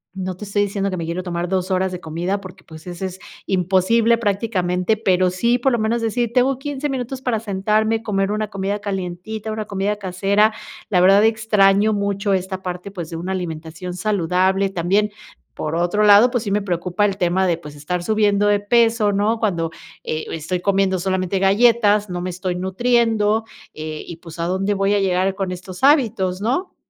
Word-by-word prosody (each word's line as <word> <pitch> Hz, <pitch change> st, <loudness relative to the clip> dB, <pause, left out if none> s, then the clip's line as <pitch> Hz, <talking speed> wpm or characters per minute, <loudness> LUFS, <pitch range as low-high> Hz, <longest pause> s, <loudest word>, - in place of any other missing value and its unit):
No 185 Hz, -1 st, -4 dB
te 210 Hz, -, -10 dB
estoy 205 Hz, 0 st, 0 dB
diciendo 200 Hz, 0 st, -2 dB
que 185 Hz, -, -4 dB
me 165 Hz, -, -3 dB
quiero 170 Hz, +2 st, -3 dB
tomar 175 Hz, -1 st, -3 dB
2 185 Hz, 0 st, -1 dB
horas 185 Hz, 0 st, 0 dB
de 180 Hz, -, -5 dB
comida 175 Hz, +5 st, -3 dB
porque, 185 Hz, -1 st, -12 dB
pues, 160 Hz, +2 st, -13 dB
ese 180 Hz, +2 st, -5 dB
es 190 Hz, 0 st, -6 dB, 0.3 s
imposible 195 Hz, +5 st, +2 dB
prácticamente, 200 Hz, -2 st, 0 dB
pero 185 Hz, -3 st, +2 dB
sí, 235 Hz, +7 st, +1 dB
por 270 Hz, +2 st, +2 dB
lo 235 Hz, -, +1 dB
menos 225 Hz, +2 st, 0 dB
decir, 230 Hz, +1 st, -1 dB
tengo 255 Hz, +1 st, +2 dB
15 290 Hz, +1 st, -4 dB
minutos 260 Hz, 0 st, -4 dB
para 240 Hz, -4 st, 0 dB
sentarme, 215 Hz, +2 st, 0 dB
comer 195 Hz, -2 st, -1 dB
una 215 Hz, 0 st, -2 dB
comida 200 Hz, +1 st, -3 dB
calientita, 200 Hz, +2 st, -5 dB
una 215 Hz, -1 st, -4 dB
comida 200 Hz, +1 st, -2 dB
casera, 200 Hz, +3 st, +2 dB, 0.4 s
la 180 Hz, -4 st, +3 dB
verdad 195 Hz, +3 st, +6 dB
extraño 215 Hz, -1 st, +3 dB
mucho 200 Hz, 0 st, -1 dB
esta 190 Hz, 0 st, -2 dB
parte, 180 Hz, +2 st, -5 dB
pues, 175 Hz, -4 st, -7 dB
de 165 Hz, -, -4 dB
una 185 Hz, +3 st, -3 dB
alimentación 165 Hz, 0 st, -5 dB
saludable, 190 Hz, 0 st, +1 dB
también, 195 Hz, +4 st, +1 dB, 0.4 s
por 155 Hz, +1 st, -4 dB
otro 175 Hz, +5 st, +1 dB
lado, 210 Hz, +4 st, +7 dB
pues, 245 Hz, -3 st, -1 dB
sí 200 Hz, -, -3 dB
me 205 Hz, 0 st, +1 dB
preocupa 180 Hz, +2 st, -1 dB
el 200 Hz, -1 st, -1 dB
tema 185 Hz, +1 st, +1 dB
de, 170 Hz, -2 st, +1 dB
pues, 150 Hz, -3 st, -11 dB
estar 175 Hz, +5 st, -3 dB
subiendo 205 Hz, 0 st, +2 dB
de 205 Hz, 0 st, +3 dB
peso, 225 Hz, 0 st, +3 dB
¿no? 215 Hz, +3 st, +1 dB
Cuando, 170 Hz, -7 st, 0 dB, 0.3 s
eh, 155 Hz, 0 st, -3 dB
estoy 165 Hz, +3 st, -3 dB
comiendo 195 Hz, 0 st, +1 dB
solamente 190 Hz, +1 st, -1 dB
galletas, 210 Hz, 0 st, +3 dB
no 175 Hz, 0 st, -3 dB
me 180 Hz, 0 st, -3 dB
estoy 180 Hz, 0 st, -3 dB
nutriendo, 220 Hz, +2 st, +1 dB, 0.3 s
eh, 155 Hz, 0 st, -6 dB
y 170 Hz, -, -8 dB
pues, 165 Hz, -1 st, -12 dB
¿a 170 Hz, -, -1 dB
dónde 190 Hz, +3 st, 0 dB
voy 195 Hz, +1 st, +1 dB
a -, -, +2 dB
llegar 190 Hz, 0 st, +1 dB
con 190 Hz, -2 st, -3 dB
estos 180 Hz, +4 st, -8 dB
hábitos?, 220 Hz, -10 st, +3 dB
¿no? 270 Hz, -, -1 dB
195 Hz, 190 wpm, -20 LUFS, 180-215 Hz, 0.4 s, lado